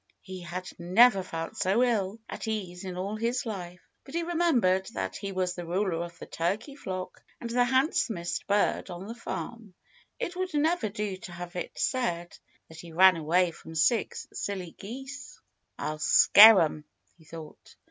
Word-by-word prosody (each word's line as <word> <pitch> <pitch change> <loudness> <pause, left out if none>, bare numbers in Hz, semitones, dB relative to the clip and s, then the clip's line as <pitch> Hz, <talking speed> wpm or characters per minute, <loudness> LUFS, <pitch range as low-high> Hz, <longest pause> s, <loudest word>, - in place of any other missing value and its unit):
He 185 -1 -8
had 180 +1 -6
never 195 +4 +5
felt 165 +3 -6
so 200 +5 +2
ill 215 -4 0
at - - -6
ease 190 -5 -4
in 180 -1 -5
all 200 +4 -3
his 235 +3 -1
life. 180 -5 -6 0.2
But 275 - -11
he 340 - 0
remembered 260 - +2
that - - -3
he 200 -1 -5
was 185 -1 -1
the 175 - -6
ruler 175 -1 -1
of 170 0 -9
the - - -9
turkey 210 - -3
flock 185 -9 -6 0.2
and 235 - -5
the 245 +1 +3
handsomest 260 - 0
bird 205 -1 +1
on 175 +1 -7
the 225 - -6
farm. 215 -1 -7 0.4
It 365 -8 -4
would 370 -3 -3
never 310 -5 +1
do 200 -1 -4
to 185 - -10
have 175 0 -8
it 180 - -5
said 175 -10 -1 0.3
that 160 0 -13
he 170 0 -10
ran 185 +2 +6
away 170 +3 +2
from 160 0 -12
six 185 +9 +1
silly 185 -4 -4
geese. 270 - -9 0.4
"I'll 155 0 -4
scare 210 +6 +8
'em," 155 -1 -1 0.3
he - - -18
thought. 160 -1 -12
190 Hz, 175 wpm, -28 LUFS, 175-235 Hz, 0.4 s, scare